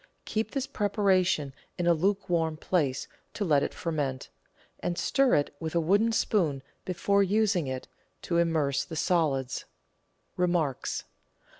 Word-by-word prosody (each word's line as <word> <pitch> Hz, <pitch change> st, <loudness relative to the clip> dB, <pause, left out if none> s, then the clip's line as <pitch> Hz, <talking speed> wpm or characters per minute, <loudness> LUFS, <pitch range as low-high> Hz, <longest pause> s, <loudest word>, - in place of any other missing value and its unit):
Keep 220 Hz, +1 st, -1 dB
this 275 Hz, -2 st, -2 dB
preparation 190 Hz, -, +1 dB, 0.2 s
in 175 Hz, -, -1 dB
a 170 Hz, -, +5 dB
luke 195 Hz, +5 st, 0 dB
warm 165 Hz, -3 st, 0 dB
place 150 Hz, -6 st, 0 dB, 0.3 s
to 205 Hz, -, -1 dB
let 145 Hz, -5 st, +4 dB
it -, -, -1 dB
ferment, 145 Hz, -6 st, -3 dB, 0.5 s
and 175 Hz, -, -2 dB
stir 270 Hz, -2 st, +3 dB
it 145 Hz, 0 st, 0 dB
with 160 Hz, 0 st, -4 dB
a -, -, +4 dB
wooden 200 Hz, +8 st, +3 dB
spoon 165 Hz, -11 st, +1 dB, 0.2 s
be 185 Hz, -, -2 dB
fore 200 Hz, +3 st, +2 dB
using 200 Hz, -4 st, +2 dB
it 130 Hz, -1 st, -4 dB, 0.4 s
to 170 Hz, -1 st, +1 dB
immerse 155 Hz, -5 st, +1 dB
the 165 Hz, -, -8 dB
solids. 145 Hz, -6 st, 0 dB, 0.7 s
Remarks. 175 Hz, -7 st, 0 dB
170 Hz, 145 wpm, -28 LUFS, 150-200 Hz, 0.7 s, a